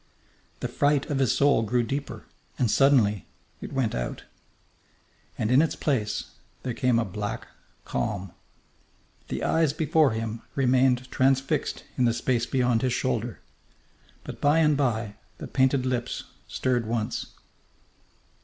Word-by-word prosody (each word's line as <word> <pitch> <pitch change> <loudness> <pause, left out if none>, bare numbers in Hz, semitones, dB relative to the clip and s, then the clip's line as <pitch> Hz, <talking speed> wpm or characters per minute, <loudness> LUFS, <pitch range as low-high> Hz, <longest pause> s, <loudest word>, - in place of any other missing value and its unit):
The - - -1
fright 145 -1 +1
of 140 - 0
his 130 -4 +2
soul 140 -4 +4
grew 120 +2 +1
deeper, 140 +5 -4 0.3
and 120 -4 +1
suddenly 120 - +3 0.3
it - - -7
went 130 -5 0
out. - - -4 1.1
And 110 - -1
in 130 +3 +6
its 160 -2 0
place 110 -8 -1 0.3
there 125 - -2
came 125 -1 +2
a 115 - +1
black 105 +4 -4 0.4
calm. 100 -4 -3 1.0
The - - -4
eyes 160 -3 +2
before 155 -4 +3
him 110 0 -4
remained 130 -1 +2
transfixed 135 +1 +1 0.2
in 125 - +4
the 115 -1 +2
space 120 -1 0
beyond 125 -4 +1
his 130 -2 +1
shoulder. 120 -3 -2 0.8
But - - -9
by 145 +2 +4
and 155 -2 +4
by 115 -6 -1 0.2
the - - -7
painted 130 0 +2
lips 125 -2 -2 0.2
stirred 125 -3 -1
once. 115 -1 -3
125 Hz, 135 wpm, -26 LUFS, 115-135 Hz, 1.1 s, in